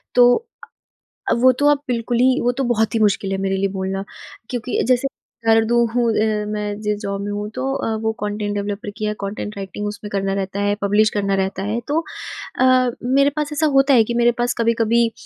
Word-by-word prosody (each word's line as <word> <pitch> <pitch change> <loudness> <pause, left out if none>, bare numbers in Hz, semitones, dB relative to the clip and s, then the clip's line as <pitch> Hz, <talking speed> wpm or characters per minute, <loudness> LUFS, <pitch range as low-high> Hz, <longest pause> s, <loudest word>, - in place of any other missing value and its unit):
तो 245 0 +7
अ, 465 0 -9 0.6
अब 235 - +1
वो 255 +1 +7
तो 290 - +2
अब 290 -1 +1
बिल्कुल 240 0 -1
ही 260 +1 +4
वो 245 - +2
तो 265 +2 -2
बहुत 230 -3 +1
ही 225 - +2
मुश्किल 200 -2 +1
है 195 - 0
मेरे 195 0 0
लिए 195 +1 +1
बोलना। 190 0 -3 0.5
क्योंकि 245 0 -2
जैसे 255 +1 +3 0.4
हूँ 230 +2 +3
अ, 215 -1 0
मैं 210 -1 -3
जिस 210 -1 -1
जॉब 200 -1 -4
में 205 0 -4
हूँ 205 +1 -4
तो 255 - -3
अ, 225 - -2
वो 220 0 0
कॉन्टेन्ट 205 0 -3
डेवलपर 205 0 -3
की 215 - -3
है, 210 - 0
कॉन्टेन्ट 210 0 -5
राइटिंग 200 +1 -5
उसमें 205 0 -6
करना 195 -1 -1
रहता 195 0 -3
है, 205 0 +1
पब्लिश 205 +2 +3
करना 200 -2 0
रहता 190 0 -2
है। 210 +4 -1
तो 300 +3 +1 0.6
अ, - - +4 0.4
मेरे 275 +3 +3
पास 300 -1 -2
ऐसा 305 +1 +1
होता 270 +1 +5
है 230 - +6
कि 235 - -4
मेरे 240 0 +4
पास 245 0 +1
कभी-कभी 230 0 +2
215 Hz, 210 wpm, -20 LUFS, 205-245 Hz, 0.6 s, तो